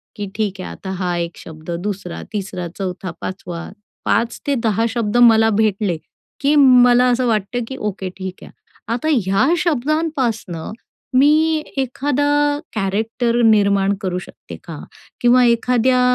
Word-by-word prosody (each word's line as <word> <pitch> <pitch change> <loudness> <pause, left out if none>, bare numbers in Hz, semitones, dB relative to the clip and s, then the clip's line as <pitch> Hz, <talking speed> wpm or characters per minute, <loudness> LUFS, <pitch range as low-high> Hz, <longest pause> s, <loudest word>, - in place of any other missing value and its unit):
की 205 -2 -4
ठीक 205 -3 -2
आहे - - -6
आता 190 - -7
हा 180 -2 -1
1 170 0 -4
शब्द, 160 +1 -9
2रा, 195 -4 -5
3रा, 190 -3 -4
4था 185 -1 -4
5वा 175 -2 -6 0.4
5-10 230 -2 0
शब्द 230 -1 -1
मला 225 -2 +6
भेटले, 210 -4 +1 0.4
की 285 +2 +2
मला 250 -3 +6
असं 250 +1 +1
वाटतं, 225 +2 -1
की 265 - -7
ओके 200 -4 -4
ठीक 190 -1 -7
आहे. - - -12 0.4
आता 245 +6 -2
ह्या 200 -3 +2
शब्दांपासनं 280 - -1 0.5
मी 310 +3 +4
एखादा 290 +2 +1 0.2
कॅरेक्टर 225 +4 0
निर्माण 200 -2 +3
करू 180 -2 -2
शकते - - -11
का? - - -8 0.4
किंवा 250 0 +5
एखाद्या 245 +2 +2
225 Hz, 130 wpm, -19 LUFS, 195-255 Hz, 0.5 s, मला